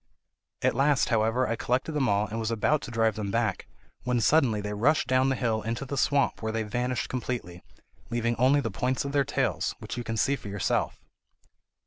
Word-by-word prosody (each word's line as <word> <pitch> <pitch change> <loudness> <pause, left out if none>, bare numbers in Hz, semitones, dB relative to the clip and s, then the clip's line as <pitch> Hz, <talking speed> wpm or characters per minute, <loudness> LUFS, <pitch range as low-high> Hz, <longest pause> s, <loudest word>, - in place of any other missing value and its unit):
At - - +3
last, 140 +1 +2
however, 115 +2 +2
I 115 - 0
collected 125 +7 -1
them 145 -4 +1
all 100 +1 +2
and 110 +2 -5
was 110 -1 -1
about 115 +7 +1
to - - -7
drive 115 -2 +1
them 105 -2 -3
back, 110 -2 -1 0.3
when 125 -1 0
suddenly 120 -4 +3
they 105 0 -4
rushed 135 +9 +2
down 130 +1 +3
the 135 - +1
hill 115 -4 0
into 115 +5 -3
the 140 - -4
swamp, 140 +1 +1
where 110 -1 -2
they 110 0 -1
vanished 125 +3 -2
completely, 120 -8 -4 0.5
leaving 120 0 0
only 135 +4 +4
the 115 - -3
points 125 +7 -1
of 140 - -3
their 140 -1 +3
tails, - - -1
which - - -7
you 120 - -3
can 115 -1 -3
see 140 +6 +2
for 120 - -10
yourself." 100 -2 -1
120 Hz, 205 wpm, -27 LUFS, 110-130 Hz, 0.5 s, only